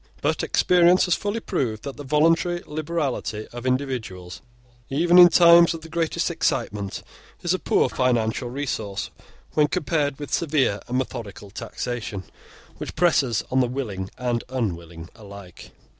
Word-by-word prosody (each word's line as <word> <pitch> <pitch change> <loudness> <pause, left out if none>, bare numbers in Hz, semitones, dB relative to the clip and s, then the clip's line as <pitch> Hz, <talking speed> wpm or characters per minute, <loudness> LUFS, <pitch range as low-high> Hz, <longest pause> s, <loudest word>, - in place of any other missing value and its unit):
But - - 0
experience 180 0 +4
has 180 - +2
fully 205 +5 -2
proved 110 - -2
that 140 -1 -6
the 145 - -8
voluntary 165 +4 +2
liberality 150 -8 -3
of 120 +1 -5
individuals, 110 - -3 0.5
even 170 +6 +4
in 175 0 +10
times 170 0 +6
of 165 - -9
the 165 - -11
greatest 170 +1 -1
excitement, 115 - -2 0.4
is 175 0 +1
a 185 - -1
poor - - +2
financial 120 -2 0
resource 120 -7 -4 0.4
when 150 -1 +3
compared 150 -4 -1
with 145 -1 -7
severe 145 - +1
and 125 - -1
methodical 115 -6 -5
taxation, 115 -2 -5 0.5
which - - -7
presses 140 -10 +2
on 130 - +2
the 125 - +3
willing 105 -7 -4
and 120 -2 -1
unwilling 85 -9 -4
alike. 100 -5 -12
130 Hz, 145 wpm, -23 LUFS, 110-165 Hz, 0.5 s, in